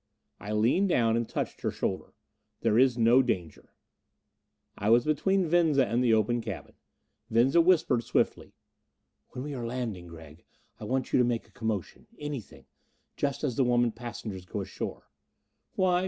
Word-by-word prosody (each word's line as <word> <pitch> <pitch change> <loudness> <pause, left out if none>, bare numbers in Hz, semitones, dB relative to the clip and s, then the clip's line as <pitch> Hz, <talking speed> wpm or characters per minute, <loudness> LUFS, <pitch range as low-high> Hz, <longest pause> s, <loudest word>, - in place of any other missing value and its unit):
I 105 - -6
leaned 120 - +2
down 115 -8 +3
and 115 -1 -1
touched - - -4
her - - 0
shoulder. - - -4 0.5
"There 110 - +3
is 130 -2 +4
no 120 +3 +5
danger." 90 - -4 1.0
I 105 - -1
was 120 +1 +5
between 185 +5 +1
Venza 160 -4 +3
and 120 +4 0
the 120 - +3
open 110 +2 +2
cabin. 110 -4 -7 0.6
Venza 125 +8 +4
whispered 165 -9 +3
swiftly, - - -1 0.8
"When 125 - -5
we 145 0 -5
are 125 -3 -5
landing, 115 -7 -4
Gregg, 80 -1 -13 0.4
I - - -7
want 130 +3 -2
you - - +5
to - - +5
make 120 -1 -1
a - - -25
commotion 110 -5 -4
anything 145 -7 -7 0.5
just 140 0 -2
as 130 -6 -1
the 135 - +4
women 120 -1 +2
passengers 110 -5 -7
go - - -4
ashore." - - -6 0.7
"Why? 180 -1 +3
120 Hz, 160 wpm, -28 LUFS, 110-140 Hz, 1.0 s, no